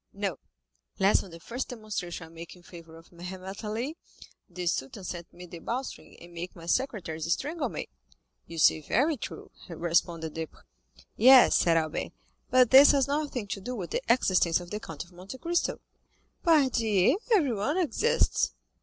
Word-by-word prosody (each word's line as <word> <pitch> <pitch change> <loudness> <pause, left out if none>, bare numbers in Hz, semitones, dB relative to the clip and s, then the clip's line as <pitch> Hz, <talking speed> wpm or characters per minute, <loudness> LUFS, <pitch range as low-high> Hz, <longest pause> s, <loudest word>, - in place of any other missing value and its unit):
"No, 195 -6 -3 0.6
lest 195 +2 +4
on 195 - -11
the 165 0 -11
first 240 +9 -5
demonstration 205 -8 -5
I - - -15
make 165 +2 -10
in 180 - -19
favor 165 -2 -13
of 165 - -17
Mehemet 185 +3 -8
Ali, 235 +9 -3 0.5
the 180 0 -6
Sultan 170 +2 -2
send 175 -1 -6
me 180 +1 -11
the 170 -1 -10
bowstring, 250 +9 -6
and 170 0 -14
make 170 +2 -7
my 165 -2 -11
secretaries 170 - -1
strangle 305 - -1
me." - - -5 0.6
"You 165 - -9
say 155 0 +4
very 280 - +1
true," 250 - -8 0.2
responded 165 -1 -1
Debray. 160 -1 -7 0.6
"Yes," 255 +3 +8
said 165 -1 +4
Albert, 155 -1 -2 0.4
"but 255 -2 +5
this 275 +2 +9
has 275 -2 +2
nothing 285 -5 -2
to 195 - -4
do 250 +6 -5
with 180 -7 -6
the - - -1
existence 185 -8 +3
of 175 0 -10
the 210 - -3
Count 165 -7 -7
of 175 - -20
Monte 185 +8 -10
Cristo." 345 +6 -1 0.6
"Pardieu! 255 - +3 0.2
everyone 280 - +1
exists." 460 - +1
190 Hz, 165 wpm, -28 LUFS, 170-255 Hz, 0.6 s, this